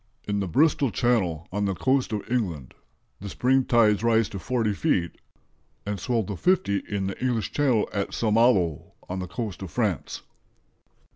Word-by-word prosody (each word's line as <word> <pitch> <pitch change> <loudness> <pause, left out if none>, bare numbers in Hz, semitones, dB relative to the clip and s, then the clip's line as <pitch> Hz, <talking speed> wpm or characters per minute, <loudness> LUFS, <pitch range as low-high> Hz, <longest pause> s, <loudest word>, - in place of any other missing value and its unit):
In 100 -1 0
the 100 - -2
Bristol 140 - +3
Channel, 95 -7 0
on 100 +2 -1
the 95 -1 -1
coast 130 +5 +1
of 105 -2 -2
England, 90 - -2 0.5
the 100 - -7
spring 130 +5 +2
tides 110 -4 +3
rise 115 -2 +3
to 100 - -6
40 110 +2 0
feet, 95 - 0 0.7
and 100 -1 -3
swell 115 +3 0
to 100 0 -5
50 170 - +1
in 100 -2 -2
the 95 +5 -5
English 120 -4 -1
Channel 130 -7 +2
at 100 -1 -2
St. 110 -2 0
Malo 100 - +2
on 95 +1 -4
the 90 - -4
coast 100 +3 -5
of 95 - -6
France." - - -2
105 Hz, 170 wpm, -25 LUFS, 95-120 Hz, 0.7 s, Bristol